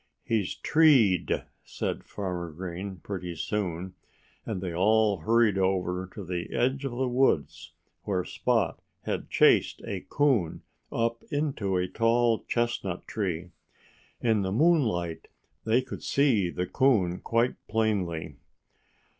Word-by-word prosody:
"He's 110 Hz, -5 st, -1 dB
treed!" 135 Hz, -, +4 dB, 0.2 s
said -, -, -4 dB
Farmer 90 Hz, -4 st, -4 dB
Green, 95 Hz, +4 st, -6 dB
pretty 90 Hz, -3 st, -5 dB
soon. 90 Hz, 0 st, -3 dB, 0.5 s
And 105 Hz, -4 st, -2 dB
they 90 Hz, -2 st, -4 dB
all 105 Hz, +3 st, +3 dB
hurried 110 Hz, +3 st, +3 dB
over 95 Hz, -1 st, 0 dB
to 105 Hz, -, -6 dB
the 90 Hz, -1 st, -4 dB
edge 130 Hz, +3 st, +1 dB
of 135 Hz, -, -3 dB
the 130 Hz, +2 st, -1 dB
woods, 125 Hz, -, 0 dB, 0.3 s
where 95 Hz, -3 st, -1 dB
Spot 100 Hz, +3 st, 0 dB, 0.2 s
had -, -, -3 dB
chased -, -, +4 dB
a 95 Hz, -2 st, -4 dB
coon 130 Hz, -, +1 dB, 0.3 s
up 115 Hz, 0 st, -1 dB
into 135 Hz, -11 st, -1 dB
a 90 Hz, 0 st, 0 dB
tall 115 Hz, +2 st, +2 dB
chestnut 120 Hz, -7 st, -2 dB
tree. 90 Hz, -4 st, -3 dB, 0.7 s
In 110 Hz, -3 st, +2 dB
the 95 Hz, -1 st, -2 dB
moonlight 110 Hz, -, +1 dB, 0.4 s
they 115 Hz, +3 st, +3 dB
could -, -, -8 dB
see 125 Hz, -10 st, +2 dB
the 90 Hz, +1 st, -2 dB
coon 95 Hz, -7 st, +2 dB
quite 115 Hz, +2 st, +1 dB
plainly. 100 Hz, -7 st, -1 dB
100 Hz, 125 wpm, -28 LUFS, 90-120 Hz, 0.7 s, treed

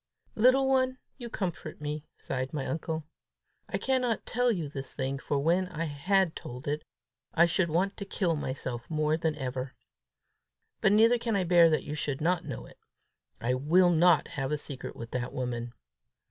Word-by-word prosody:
"Little 255 Hz, +4 st, +5 dB
one, 260 Hz, -1 st, +2 dB, 0.2 s
you 240 Hz, -1 st, -6 dB
comfort 175 Hz, -7 st, -4 dB
me," 150 Hz, 0 st, -4 dB
sighed 130 Hz, +2 st, -4 dB
my 135 Hz, -3 st, -2 dB
uncle. 160 Hz, -1 st, -3 dB, 0.6 s
"I -, -, -1 dB
cannot 255 Hz, -4 st, 0 dB
tell 245 Hz, +1 st, +2 dB
you 170 Hz, -8 st, -2 dB
this 135 Hz, -1 st, -7 dB
thing, 135 Hz, 0 st, -2 dB
for 145 Hz, -, -1 dB
when 170 Hz, +6 st, +2 dB
I 165 Hz, -2 st, -4 dB
had 165 Hz, +4 st, +1 dB
told 125 Hz, +5 st, -8 dB
it, 150 Hz, +1 st, -1 dB, 0.5 s
I 170 Hz, -, +7 dB
should 170 Hz, 0 st, +1 dB
want 185 Hz, +5 st, 0 dB
to 200 Hz, -, -5 dB
kill 180 Hz, -4 st, 0 dB
myself 130 Hz, -4 st, -4 dB
more 155 Hz, -1 st, +1 dB
than 160 Hz, -1 st, -1 dB
ever. 130 Hz, -2 st, -4 dB, 1.1 s
But 195 Hz, -, +4 dB
neither 225 Hz, +3 st, +5 dB
can 230 Hz, -2 st, -1 dB
I 195 Hz, -, +2 dB
bear 170 Hz, -1 st, +6 dB
that 155 Hz, -, +1 dB
you 150 Hz, -, -5 dB
should 145 Hz, -2 st, -2 dB
not 175 Hz, +2 st, +1 dB
know -, -, -6 dB
it. -, -, -17 dB, 0.6 s
I 120 Hz, +2 st, 0 dB
will 170 Hz, +8 st, +4 dB
not 170 Hz, -2 st, +4 dB
have 135 Hz, 0 st, -3 dB
a 150 Hz, -, +1 dB
secret 140 Hz, -2 st, -6 dB
with 115 Hz, 0 st, -8 dB
that 125 Hz, 0 st, -3 dB
woman! 120 Hz, -2 st, -3 dB
160 Hz, 180 wpm, -29 LUFS, 135-190 Hz, 1.1 s, I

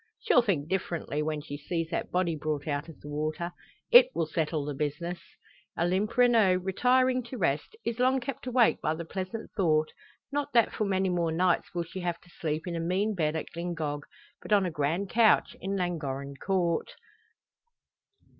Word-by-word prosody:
She'll 445 Hz, -, +4 dB
think 175 Hz, -11 st, 0 dB
differently 170 Hz, -5 st, -2 dB
when 155 Hz, -1 st, -2 dB
she 145 Hz, -1 st, -7 dB
sees 165 Hz, +2 st, -3 dB
that -, -, -2 dB
body 180 Hz, -2 st, +1 dB
brought 150 Hz, -1 st, -3 dB
out 145 Hz, +2 st, -2 dB
of 160 Hz, -, -12 dB
the -, -, -10 dB
water. 155 Hz, +4 st, -3 dB, 0.4 s
It -, -, +9 dB
will 165 Hz, -, +1 dB
settle 155 Hz, -1 st, -1 dB
the 145 Hz, -, -3 dB
business!" 150 Hz, +5 st, -3 dB, 0.6 s
Olympe 185 Hz, +7 st, 0 dB
Renault, 230 Hz, -6 st, +5 dB
retiring 255 Hz, +6 st, +3 dB
to 250 Hz, +2 st, -7 dB
rest, 160 Hz, -, -1 dB
is 235 Hz, 0 st, -2 dB
long 260 Hz, +1 st, +3 dB
kept 260 Hz, 0 st, -6 dB
awake 245 Hz, -2 st, +3 dB
by 155 Hz, -, 0 dB
the 170 Hz, +1 st, -6 dB
pleasant 190 Hz, +5 st, -5 dB
thought, 155 Hz, -6 st, +1 dB, 0.4 s
not 290 Hz, 0 st, -2 dB
that 235 Hz, -2 st, +4 dB
for 215 Hz, -, -1 dB
many 190 Hz, -1 st, +1 dB
more 170 Hz, -2 st, 0 dB
nights 175 Hz, +1 st, +1 dB
will 170 Hz, -, 0 dB
she 170 Hz, +3 st, -8 dB
have 175 Hz, -2 st, -2 dB
to 180 Hz, -, -21 dB
sleep 155 Hz, -1 st, -3 dB
in 175 Hz, -2 st, -3 dB
a -, -, -2 dB
mean 185 Hz, +6 st, 0 dB
bed 155 Hz, -4 st, 0 dB
at 160 Hz, -, -4 dB
Glyngog, 165 Hz, -4 st, -3 dB, 0.4 s
but -, -, -10 dB
on 200 Hz, -2 st, +5 dB
a 180 Hz, -, -2 dB
grand 155 Hz, +6 st, -1 dB
couch 230 Hz, -1 st, +4 dB
in 195 Hz, +1 st, -2 dB
Llangorren 140 Hz, -6 st, -3 dB
Court. 185 Hz, -, -1 dB
175 Hz, 185 wpm, -29 LUFS, 155-200 Hz, 0.6 s, It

